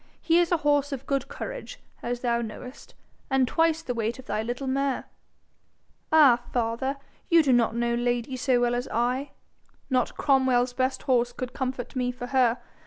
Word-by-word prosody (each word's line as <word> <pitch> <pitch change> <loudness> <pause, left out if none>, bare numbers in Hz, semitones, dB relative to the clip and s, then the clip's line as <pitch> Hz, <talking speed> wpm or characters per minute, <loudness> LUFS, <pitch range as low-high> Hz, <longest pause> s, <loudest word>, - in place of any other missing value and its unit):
He 335 +1 +3
is 345 0 +1
a 345 - +4
horse 290 -1 +2
of 275 -1 -5
good 275 -1 -1
courage, - - -7 0.2
as 240 0 -3
thou 235 -1 +1
knowest, 245 +3 -9 0.3
and 265 -2 +3
twice 325 +1 +1
the 250 - -3
weight 230 0 -2
of 260 - -11
thy 210 -2 -2
little 245 +4 -4
mare.' 270 0 -1 1.1
'Ah, 280 -7 +6
father! 245 +3 -1 0.3
you 335 -2 +6
do 270 -3 +3
not 235 -2 +2
know 235 0 0
Lady 240 +1 -1
so 255 -1 +2
well 240 0 +1
as 245 +1 -2
I. 250 +4 0 0.6
Not 255 -1 0
Cromwell's 260 -3 +2
best 260 +1 -1
horse 245 -2 +2
could 250 0 -6
comfort 260 -1 -4
me 250 -1 0
for 245 0 -7
her. 250 -2 +2
255 Hz, 175 wpm, -26 LUFS, 240-275 Hz, 1.1 s, Ah